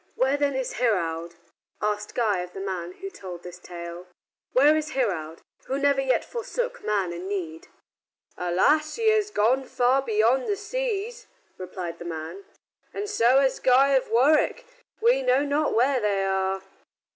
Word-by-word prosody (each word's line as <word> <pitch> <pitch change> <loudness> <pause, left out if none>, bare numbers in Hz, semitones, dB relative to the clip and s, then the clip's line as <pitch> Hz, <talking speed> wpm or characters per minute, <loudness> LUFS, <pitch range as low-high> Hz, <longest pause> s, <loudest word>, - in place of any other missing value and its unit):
"Where, 265 +2 +2
then, 285 -1 0
is 265 -1 -3
Heraud?" 170 -7 0 0.4
asked 210 0 -2
Guy 215 -6 +1
of 180 0 -6
the - - -7
man 185 -3 -4
who 390 - -8
told 180 - -9
this 180 0 -10
tale. 175 0 -8 0.4
"Where 290 +4 +5
is 310 0 -2
Heraud, 170 -11 -2 0.2
who 265 - -2
never 280 -1 +2
yet 265 -1 +1
forsook - - -4
man 195 -4 0
in 175 +2 -6
need?" 170 -5 -5 0.7
"Alas! 295 - +2
he 455 -1 +2
has 425 -1 +1
gone 255 - +2
far 255 +1 +2
beyond 235 +2 +2
the 410 - +1
seas," 465 +2 -4 0.3
replied 180 -2 -6
the 175 - -8
man, 165 - -6 0.5
"and 410 +1 -4
so 265 - +4
has 265 -1 +1
Guy 265 +2 +5
of 270 -2 +2
Warwick. 300 - +3 0.4
We 485 +2 +4
know - - +2
not 290 +1 0
where 255 +3 +3
they 200 -3 0
are." 190 0 -1
245 Hz, 160 wpm, -25 LUFS, 185-300 Hz, 0.7 s, Where